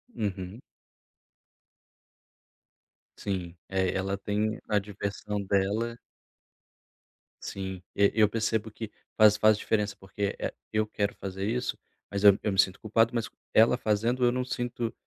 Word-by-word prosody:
Uhum. 100 Hz, +1 st, -4 dB, 2.6 s
Sim, 90 Hz, -4 st, -3 dB
é, 95 Hz, -1 st, +1 dB
ela 95 Hz, +1 st, -1 dB
tem 105 Hz, +2 st, -1 dB
a 105 Hz, -1 st, +3 dB
diversão 100 Hz, 0 st, -4 dB
dela. 105 Hz, +5 st, 0 dB, 1.5 s
Sim. 95 Hz, -2 st, -5 dB
Eu 100 Hz, 0 st, +4 dB
eu 105 Hz, -1 st, +4 dB
percebo 110 Hz, 0 st, -1 dB
que 110 Hz, 0 st, -7 dB, 0.3 s
faz 105 Hz, -1 st, +7 dB
faz 110 Hz, 0 st, +5 dB
diferença. 105 Hz, -2 st, 0 dB
Porque, 100 Hz, +1 st, -3 dB
eh, -, -, -2 dB, 0.2 s
eu 110 Hz, 0 st, +2 dB
quero 105 Hz, -1 st, -2 dB
fazer 95 Hz, 0 st, -5 dB
isso, 125 Hz, +3 st, -1 dB, 0.3 s
mas 100 Hz, 0 st, -3 dB
eu 100 Hz, -1 st, +8 dB
eu 105 Hz, -, +1 dB
me 95 Hz, -, -1 dB
sinto 95 Hz, -1 st, +3 dB
culpado. 115 Hz, +2 st, +2 dB
Mas 115 Hz, -, 0 dB, 0.3 s
ela 115 Hz, +3 st, +6 dB
fazendo, 115 Hz, +3 st, +1 dB
eu 120 Hz, -, +5 dB
não 125 Hz, 0 st, -1 dB
sinto, 120 Hz, -2 st, -3 dB
105 Hz, 135 wpm, -28 LUFS, 100-110 Hz, 2.6 s, eu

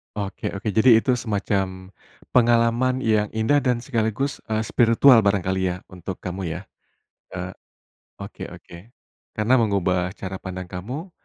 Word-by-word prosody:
Oke 100 Hz, -2 st, -4 dB
oke 105 Hz, +2 st, -3 dB
jadi 115 Hz, +3 st, +6 dB
itu 130 Hz, -, +2 dB
semacam 95 Hz, -4 st, -2 dB, 0.4 s
pengalaman 120 Hz, +2 st, +3 dB
yang 110 Hz, -1 st, +2 dB
indah 110 Hz, +7 st, +3 dB
dan 125 Hz, -4 st, 0 dB
sekaligus, 120 Hz, +2 st, -1 dB
eee, 110 Hz, 0 st, 0 dB
spiritual 115 Hz, +2 st, +5 dB
barangkali 95 Hz, -2 st, +1 dB
ya -, -, -8 dB
untuk 90 Hz, +1 st, -8 dB
kamu 90 Hz, -3 st, -4 dB
ya. 90 Hz, -, -6 dB, 0.7 s
Eee, -, -, -6 dB, 0.7 s
oke -, -, -7 dB
oke. 85 Hz, -, -13 dB, 0.6 s
Karena, 110 Hz, +4 st, +2 dB
mengubah 90 Hz, -4 st, +1 dB
cara 95 Hz, -2 st, -6 dB
pandang 95 Hz, -2 st, -7 dB
kamu, 125 Hz, -, -6 dB
105 Hz, 135 wpm, -23 LUFS, 95-120 Hz, 0.7 s, jadi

